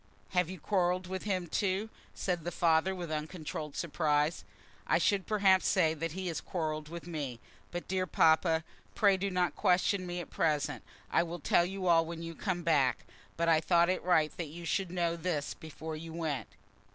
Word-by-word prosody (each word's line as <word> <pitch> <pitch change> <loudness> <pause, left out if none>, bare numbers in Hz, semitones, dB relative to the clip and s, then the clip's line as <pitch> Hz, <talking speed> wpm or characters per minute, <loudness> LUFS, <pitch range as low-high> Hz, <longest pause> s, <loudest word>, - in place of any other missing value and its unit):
"Have 180 -2 +1
you 185 -1 -7
quarrelled 185 0 +1
with 190 +1 -5
him 185 -4 0
too?" 195 +4 0 0.3
said 180 -2 -1
her 170 +2 -4
father, 170 +2 +2
with 175 -3 -5
uncontrolled 155 -1 -4
surprise. 155 -1 0 0.4
"I - - +4
should 200 -2 +1
perhaps 195 -3 +4
say 165 -4 +3
that 165 0 -4
he 190 +1 -4
has 170 -3 -2
quarrelled 155 -3 -3
with 170 0 -7
me. 145 -8 -4 0.3
But, 175 0 -5
dear 185 0 0
papa, 160 0 +4 0.3
pray 200 -2 +5
do 195 +1 -1
not 180 -4 0
question 185 +1 +2
me 175 0 -3
at 175 - -8
present. 150 -3 0 0.3
I - - +4
will 170 0 -4
tell 170 +1 +3
you 190 +1 -4
all 170 -2 +5
when 165 0 -6
you 165 0 -5
come 175 0 -2
back, 145 -6 +2 0.3
but 170 0 +1
I 160 -1 +5
thought 170 +1 +4
it 185 - -1
right 160 -4 +2
that 170 - -3
you 170 +3 -8
should 190 +2 0
know 170 -1 0
this 165 -4 -2
before 160 0 -7
you 160 +1 -8
went." 160 -5 -2
170 Hz, 190 wpm, -32 LUFS, 160-185 Hz, 0.4 s, pray